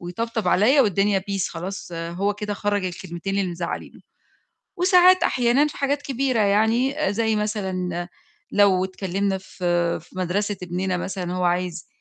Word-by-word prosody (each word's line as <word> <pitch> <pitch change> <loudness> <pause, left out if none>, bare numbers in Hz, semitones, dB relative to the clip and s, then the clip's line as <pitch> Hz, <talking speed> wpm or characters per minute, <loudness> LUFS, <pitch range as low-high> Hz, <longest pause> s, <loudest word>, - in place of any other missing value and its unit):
ويطبطب 225 +6 -3
عليَّ 255 +9 +5
والدنيا 200 -3 +2
peace 195 -2 -1
خلاص، 180 +1 -6
هو 170 +5 -2
كده 210 0 -4
خرَّج 205 -1 -1
الكلمتين 180 +2 -4
اللي 190 -2 0
مزعّلينه، 170 0 -5 0.8
وساعات 365 0 +5
أحيانًا 250 +3 +3
في 300 - -7
حاجات 280 +1 0
كبيرة 265 -4 0
يعني 220 +7 +2 0.2
زي 220 0 +1
مثلًا 185 -5 -2 0.4
لو 195 -3 +4
اتكلّمنا 190 +1 -2
في 175 -2 -1
في 180 +3 -13
مَدرسة 200 +3 -1
ابننا 180 +1 -2
مثلًا 180 -1 -4
هو 180 - -1
عايز 175 -1 -1
195 Hz, 140 wpm, -23 LUFS, 180-220 Hz, 0.8 s, عليَّ